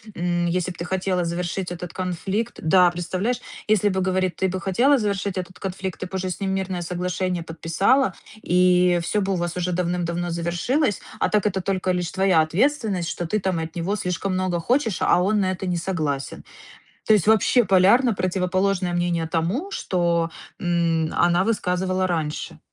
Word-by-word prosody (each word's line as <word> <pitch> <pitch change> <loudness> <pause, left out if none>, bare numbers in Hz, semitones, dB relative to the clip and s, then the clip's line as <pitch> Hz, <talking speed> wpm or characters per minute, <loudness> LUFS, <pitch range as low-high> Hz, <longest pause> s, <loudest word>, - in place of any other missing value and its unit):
М, 175 0 0
если 180 +1 -1
б 175 - -11
ты 170 - -4
хотела 185 -1 -1
завершить 175 +2 -3
этот 175 -1 -6
конфликт 190 +5 -3
да, 180 +2 +5
представляешь, 185 +7 -2 0.3
если 210 -1 +3
бы, 190 -1 -1
говорит, 185 -2 0
ты - - +4
бы 185 +1 -4
хотела 245 +10 +3
завершить 200 -3 -2
этот 185 0 -6
конфликт, 190 -1 -5
ты - - -4
б 190 - -8
уже 185 0 -2
с 180 - -5
ним 195 -1 -1
мирное 190 -2 -2
соглашение 180 0 -2
подписала. 165 - +1 0.3
И 180 -1 +3
всё 210 +4 0
бы 195 0 0
у - - 0
вас 175 0 -3
уже 180 0 -1
давным-давно 175 0 -1
завершилось, 175 - 0 0.2
а - - +1
так 210 -1 +1
это 190 -2 0
только 185 0 -1
лишь 180 -2 -2
твоя 190 -3 +3
ответственность, 190 - 0
что 175 - -3
ты 215 +6 0
там 185 -4 -1
от 160 0 -5
него 175 +4 -1
слишком 185 0 -2
много 185 -2 0
хочешь, 235 - 0
а 180 - +4
он 205 +2 +2
на 185 -1 +1
это 185 +1 -4
не 180 -1 0
согласен. 155 -6 -3 0.6
То 220 - +6
есть 205 -2 +2
вообще 220 +3 +4
полярно 200 +7 +4
противоположное 185 0 0
мнение 175 -2 0
тому, 180 - -1
что, 170 -2 0 0.3
м, 170 -2 +1
она 175 +1 +3
высказывала 185 -3 0
раньше. 160 -4 -3
180 Hz, 180 wpm, -23 LUFS, 175-195 Hz, 0.6 s, То